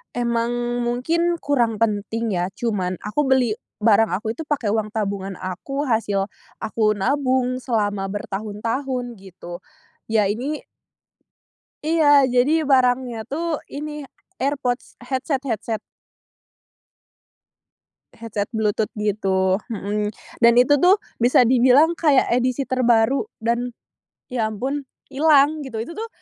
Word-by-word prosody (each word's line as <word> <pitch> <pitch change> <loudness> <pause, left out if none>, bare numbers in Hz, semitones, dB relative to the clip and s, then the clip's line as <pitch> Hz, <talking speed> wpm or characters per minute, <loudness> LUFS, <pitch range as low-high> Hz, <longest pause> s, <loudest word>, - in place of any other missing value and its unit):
emang 240 0 -1
mungkin 335 +8 +1
kurang 240 -6 +1
penting 220 +1 -1
ya. 180 - 0
Cuman, 190 -6 -1
aku 270 +8 -1
beli 260 -4 +3 0.3
barang 220 -1 +4
aku 220 +3 -3
itu 315 +6 -7
pakai 250 -9 0
uang 215 -1 0
tabungan 195 -2 -2
aku, 190 +10 -4
hasil 220 -6 0 0.4
aku 215 -1 +1
nabung 255 +3 0
selama 205 -6 -1
bertahun-tahun 225 +5 -4
gitu. 175 -2 -10 0.5
Ya 220 -1 +2
ini 275 +8 -4 1.2
Iya, 295 -3 +5
jadi 250 +4 +3 0.2
barangnya 250 -3 +2
tuh 320 +1 -2
ini, 295 -1 -6 0.3
AirPods, 265 -2 -2
headset 260 +2 -2
headset. 225 -3 -2 2.4
Headset 215 -3 -3
Bluetooth 215 -1 0
gitu, 195 -2 +1 0.2
mhm. 210 +1 -2 0.3
Dan 235 0 +6
itu 270 +4 +5
tuh, 365 +4 +6 0.3
bisa 245 +1 +5
dibilang 260 +7 +5
kayak 295 -5 +3
edisi 250 +2 +1
terbaru 250 - +3 0.2
dan 235 +1 -1 0.6
ya 225 -3 0
ampun, 265 +6 -3 0.3
ilang 300 +1 +4
gitu. 255 -5 -7
Itu 335 - -9
tuh, 450 +1 -4
240 Hz, 115 wpm, -22 LUFS, 215-275 Hz, 2.4 s, Dan